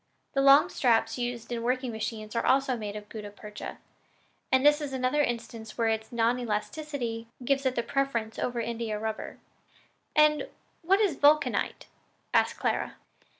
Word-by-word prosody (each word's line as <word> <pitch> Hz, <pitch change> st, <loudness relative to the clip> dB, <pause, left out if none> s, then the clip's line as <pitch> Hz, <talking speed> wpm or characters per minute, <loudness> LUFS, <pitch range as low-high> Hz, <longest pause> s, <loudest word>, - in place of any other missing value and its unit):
The 275 Hz, -, +2 dB
long 275 Hz, +4 st, +7 dB
straps 240 Hz, -5 st, +2 dB
used 240 Hz, -1 st, -4 dB
in 235 Hz, -1 st, -2 dB
working 250 Hz, +1 st, 0 dB
machines 220 Hz, -1 st, -5 dB
are 230 Hz, -, +1 dB
also 270 Hz, -1 st, +3 dB
made 210 Hz, -3 st, -5 dB
of 210 Hz, 0 st, -7 dB
gutta 210 Hz, -1 st, -7 dB
percha, 210 Hz, +1 st, -8 dB, 0.7 s
and 260 Hz, +1 st, +4 dB
this 295 Hz, +1 st, +6 dB
is 285 Hz, -2 st, -4 dB
another 260 Hz, +3 st, +1 dB
instance 230 Hz, -4 st, -4 dB
where 230 Hz, -1 st, +2 dB
its 220 Hz, 0 st, -2 dB
non 235 Hz, +1 st, +2 dB
elasticity 235 Hz, +1 st, -3 dB, 0.2 s
gives 275 Hz, +1 st, +2 dB
it 255 Hz, -, -1 dB
the 235 Hz, -, 0 dB
preference 235 Hz, -6 st, -1 dB
over 245 Hz, -1 st, -1 dB
India 230 Hz, -2 st, -2 dB
rubber." 220 Hz, 0 st, -4 dB, 0.8 s
"And 300 Hz, 0 st, +4 dB, 0.3 s
what 380 Hz, +4 st, +3 dB
is 390 Hz, -8 st, +2 dB
vulcanite?" 300 Hz, +1 st, +3 dB, 0.5 s
asked -, -, +3 dB
Clara. -, -, -1 dB
240 Hz, 155 wpm, -28 LUFS, 225-275 Hz, 0.8 s, long